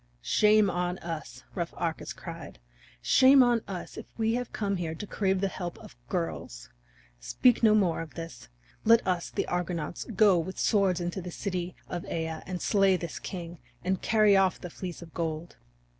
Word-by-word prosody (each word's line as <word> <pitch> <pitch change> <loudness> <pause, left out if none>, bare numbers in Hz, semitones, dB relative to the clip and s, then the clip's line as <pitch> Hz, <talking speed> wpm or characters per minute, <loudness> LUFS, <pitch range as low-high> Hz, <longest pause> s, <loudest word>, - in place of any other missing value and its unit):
"Shame 210 - +4
on 180 0 -1
us," 155 -8 -7
rough 170 -3 -4
Arcas 165 -2 -3
cried, - - -9 0.5
"shame 265 0 +7
on 240 -2 +3
us 185 -3 -6
if - - -8
we 225 0 +1
have 245 0 -2
come 200 -2 -1
here 165 -2 -3
to 210 - -6
crave 190 -2 0
the 195 - +2
help 175 -2 -5
of - - -13
girls! - - -4 0.5
Speak 235 - +3
no 215 -2 +6
more 180 -6 +2
of 165 - -9
this! 165 - -8 0.3
Let 230 +1 +5
us, 180 -2 0
the - - -2
Argonauts, 175 -2 -3
go 205 -4 +4
with 185 +3 -5
swords 195 -4 +2
into 175 +2 -3
the 180 - -6
city 180 -1 -4
of 175 - -4
Aea, 160 -1 -3
and 180 -1 -4
slay 195 -3 +4
this 170 -3 -6
king, 170 -2 -7 0.2
and 185 +1 0
carry 215 -2 +4
off 190 -1 +3
the 180 - -8
Fleece 180 -1 -7
of 165 - -14
Gold." 165 0 -4
180 Hz, 180 wpm, -28 LUFS, 165-200 Hz, 0.5 s, shame